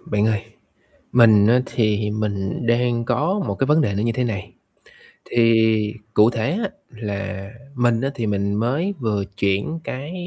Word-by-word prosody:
Bạn 105 0 0
ơi, 110 -3 0 0.7
mình 110 -4 +6
á, 125 +2 +5
thì 105 -2 0
mình 105 0 -3
đang 120 0 +1
có 180 - 0
một - - -2
cái 135 - 0
vấn 150 +2 +4
đề 105 -8 0
nó 100 +2 -1
như 115 - +1
thế 125 +2 -1
này. 100 -6 -4 0.8
Thì 115 -1 +4 0.6
cụ 105 +2 +6
thể 115 -2 -1
á, 205 - -1 0.2
là 100 -3 -5 0.2
mình 120 -3 +2
á 135 +2 -1
thì 120 -5 -3
mình 100 -1 -1
mới 135 - 0
vừa 105 -4 -1
chuyển 100 +11 0
cái 140 +4 -6
115 Hz, 170 wpm, -21 LUFS, 105-125 Hz, 0.8 s, mình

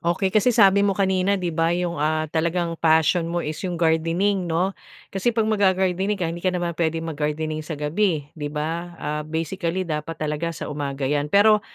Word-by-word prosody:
Okey, 180 +2 0
kasi 215 +3 +4
sabi 200 -4 +5
mo 200 -2 +2
kanina, 190 0 +2
'di 175 -3 -2
ba, 165 +1 +1
yung, 175 -4 -2
ah, 155 +1 +1
talagang 170 +1 0
passion 160 +1 +3
mo 175 0 -2
is 155 0 -4
yung 175 - -3
gardening, 170 +3 +1
'no? 180 +4 +1 0.4
Kasi 195 +4 0
pag 225 -2 +2
magga-gardening 190 -1 +1
ka 180 - -2
hindi 165 +1 -3
ka 185 - +1
naman 175 -1 -2
pwedeng 165 0 -1
mag-gardening 155 0 -2
sa 155 0 -6
gabi, 155 +1 0
di 150 -3 -5
ba? 165 +4 -4
Ah, 150 0 -3
basically 165 +3 -2
dapat 160 0 -4
talaga 155 +2 -2
sa - - -5
umaga 140 -1 -3
yan, 145 +2 0
pero 210 +3 +5
170 Hz, 190 wpm, -23 LUFS, 155-190 Hz, 0.4 s, sabi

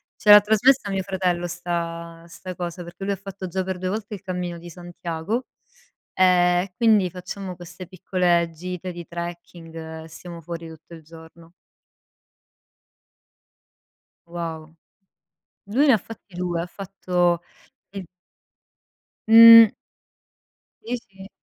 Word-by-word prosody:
Ce 210 - -2
l'ha 205 0 +11
trasmessa 220 +1 +2
mio 195 -1 -1
fratello 185 -2 -2
'sta 170 -1 -5
'sta 180 +2 -9
cosa, 175 0 -6
perché 175 +3 -10
lui 200 0 -1
ha - - -3
fatto 195 -1 -8
già 185 +2 -2
per 185 -1 -5
2 185 0 -3
volte 210 +1 -5
il 195 - -7
cammino 180 -2 -5
di 175 +1 -11
Santiago, 175 +6 -5 0.7
ehm, 180 -1 +4
e 190 -2 -11
quindi 215 -5 +3
facciamo 185 +1 -7
queste 175 +1 -11
piccole 180 -2 0
gite 180 +2 -6
di 170 -1 -9
trekking 165 -2 -8
e - - -12
stiamo 170 +1 -10
fuori 165 0 -7
tutto 160 +1 -14
il 160 - -13
giorno. 165 +1 -16 2.7
Wow. 165 -2 -7 0.9
Lui 270 +8 +2
ne 240 -5 +6
fatti 205 -3 -13
2, 175 -2 -2
ha - - -4
fatto 180 -2 -1 0.5
il 195 -3 -8 1.2
Mh. 230 -1 +10 1.1
Sì, 245 +2 -3
sì. 195 +1 -13
180 Hz, 130 wpm, -23 LUFS, 170-195 Hz, 2.7 s, l'ha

